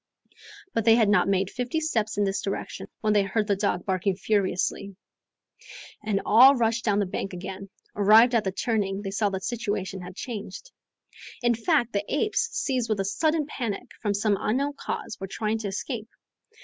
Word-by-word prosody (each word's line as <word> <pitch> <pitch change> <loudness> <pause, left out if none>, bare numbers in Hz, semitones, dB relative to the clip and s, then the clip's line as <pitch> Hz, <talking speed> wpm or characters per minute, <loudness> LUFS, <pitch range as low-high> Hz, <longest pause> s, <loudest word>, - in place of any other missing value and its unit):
But 230 - 0
they 225 -1 +7
had 225 -3 +3
not 205 - +4
made 195 0 +1
fifty 250 +5 -2
steps 225 -10 -1
in 205 - +2
this 195 0 -1
direction, 195 - -5
when 215 -1 +2
they 205 - +4
heard 210 +2 0
the 205 -1 +1
dog 195 -3 -1
barking 190 0 0
furiously. 195 -1 -1 1.1
And 210 -2 -1
all 260 +5 +8
rushed 230 -1 +1
down 205 -3 +2
the 205 - +2
bank 190 +1 -4
again. 190 +2 -7 0.3
Arrived 220 +4 +6
at 230 -3 +3
the 190 - -1
turning, 200 -1 -1
they 195 - -4
saw 205 +1 +1
that 190 -1 -4
the - - -6
situation 205 -5 -3
had 180 0 -9
changed. 240 - -7 0.7
In 240 0 +4
fact, 240 0 +1
the 200 0 0
apes, 425 +8 +1
seized 260 - -1
with 215 -2 0
a 195 - 0
sudden 310 +9 +1
panic, 235 -8 -5
from 205 -2 0
some 205 0 +1
unknown 275 +6 0
cause, 245 - -5
were 195 - -5
trying 215 +3 -2
to 215 - -4
escape. 220 +3 -4
210 Hz, 190 wpm, -26 LUFS, 195-235 Hz, 1.1 s, all